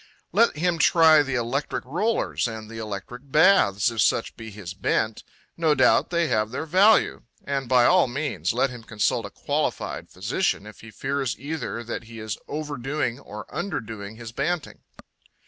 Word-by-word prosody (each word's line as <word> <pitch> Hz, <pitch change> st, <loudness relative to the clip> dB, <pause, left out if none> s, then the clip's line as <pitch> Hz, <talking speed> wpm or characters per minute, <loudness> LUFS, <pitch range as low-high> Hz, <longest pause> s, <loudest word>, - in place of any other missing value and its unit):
Let 235 Hz, -, +3 dB
him 170 Hz, +1 st, 0 dB
try 160 Hz, -1 st, +6 dB
the 135 Hz, -2 st, -2 dB
electric 125 Hz, +5 st, -2 dB
rollers 180 Hz, -, 0 dB
and 110 Hz, -1 st, -7 dB
the 115 Hz, -, -7 dB
electric 110 Hz, +6 st, -7 dB
baths, 125 Hz, -, +4 dB
if 115 Hz, -2 st, 0 dB
such 115 Hz, -, +1 dB
be 115 Hz, -1 st, -9 dB
his 100 Hz, -3 st, -8 dB
bent; 110 Hz, +2 st, -1 dB, 0.3 s
no 160 Hz, -3 st, +2 dB
doubt 130 Hz, -2 st, +4 dB
they 170 Hz, -1 st, +1 dB
have 110 Hz, -4 st, +1 dB
their 130 Hz, +6 st, -4 dB
value. 190 Hz, +7 st, +4 dB, 0.2 s
And 135 Hz, -3 st, -3 dB
by 125 Hz, -2 st, +5 dB
all 180 Hz, -5 st, +5 dB
means 125 Hz, -, -2 dB
let 125 Hz, +3 st, +1 dB
him 125 Hz, -2 st, -9 dB
consult 110 Hz, -2 st, -1 dB
a -, -, -12 dB
qualified -, -, -3 dB
physician 105 Hz, -, -1 dB
if 105 Hz, -, -12 dB
he 115 Hz, -, -11 dB
fears 135 Hz, +3 st, -2 dB
either 145 Hz, -5 st, -4 dB
that 115 Hz, 0 st, -5 dB
he 115 Hz, 0 st, -10 dB
is 110 Hz, -1 st, -5 dB
overdoing 145 Hz, -3 st, -3 dB
or 105 Hz, -6 st, -9 dB
underdoing 110 Hz, -, -5 dB
his 115 Hz, -1 st, -8 dB
banting. 175 Hz, +6 st, -2 dB
125 Hz, 165 wpm, -25 LUFS, 110-155 Hz, 0.3 s, try